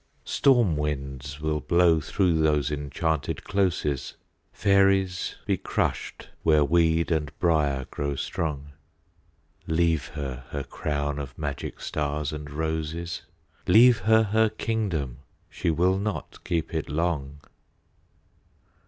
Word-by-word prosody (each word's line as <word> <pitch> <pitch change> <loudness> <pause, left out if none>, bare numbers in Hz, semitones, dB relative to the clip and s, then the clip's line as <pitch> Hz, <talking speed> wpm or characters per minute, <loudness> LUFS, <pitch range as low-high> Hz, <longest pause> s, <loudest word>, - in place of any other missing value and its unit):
Storm 120 - +3
winds 70 -2 -4
will 75 0 -1
blow 85 0 +4
through 90 +3 +1
those 75 -2 +2
enchanted 75 0 -2
closes, 85 -8 -1 0.4
Fairies 95 -2 +2
be - - +1
crushed - - -2
where 75 -2 +4
weed 85 +1 +2
and 75 -3 0
briar 75 -6 +1
grow 70 -1 -2
strong... 75 0 -3 1.0
Leave 80 -1 +1
her 65 -4 -6
her 70 -1 -3
crown 75 0 -3
of 70 -1 -7
magic 75 -3 -4
stars 75 0 -2
and 75 -1 -6
roses, 80 +2 -3 0.5
Leave 120 0 +7
her 110 +3 +4
her 110 +1 +3
kingdom—she 85 - -3
will 90 +4 +2
not 105 0 -4
keep 85 -2 -2
it 80 -2 -2
long! 75 -3 -2
80 Hz, 110 wpm, -26 LUFS, 75-90 Hz, 1.0 s, Leave